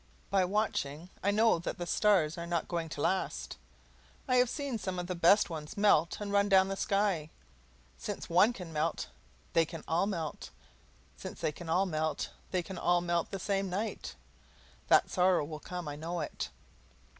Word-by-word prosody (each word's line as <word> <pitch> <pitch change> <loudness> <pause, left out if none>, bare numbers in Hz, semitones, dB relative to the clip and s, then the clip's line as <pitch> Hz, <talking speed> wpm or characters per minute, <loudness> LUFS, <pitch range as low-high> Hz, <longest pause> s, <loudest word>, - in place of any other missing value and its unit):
By 195 -2 +4
watching, 180 -5 -1
I 200 - +1
know 220 -2 +4
that 170 - -4
the 175 - -4
stars 175 -4 +3
are 170 -1 -6
not 170 -1 -1
going 170 -2 -2
to 145 - -5
last. 190 +4 -1 0.7
I 255 -1 +3
have 250 -1 +4
seen 280 -5 -3
some 185 -2 -3
of 180 - -2
the 180 - -3
best 175 +4 +5
ones 155 +1 -6
melt 200 -6 +3
and 205 -1 -4
run 200 0 +3
down 190 -1 +5
the 195 - -2
sky. 195 -6 0 0.7
Since - - -5
one 185 +7 +5
can 180 -8 -8
melt, 155 +1 -1 0.4
they 165 - +5
can 160 0 -7
all 170 +4 +2
melt; 165 -6 -4 0.7
since - - -8
they - - 0
can 165 +2 -9
all 185 +4 +3
melt, 155 -3 -2 0.2
they 185 -2 0
can 185 0 -7
all 175 0 +3
melt 170 -1 0
the 195 - -4
same 195 0 -1
night. 205 +5 -3 0.7
That - - +5
sorrow 180 -4 +3
will 155 0 -7
come 180 +2 -6
I 145 - -4
know 165 +2 -3
it. - - -4
180 Hz, 185 wpm, -31 LUFS, 165-200 Hz, 0.7 s, best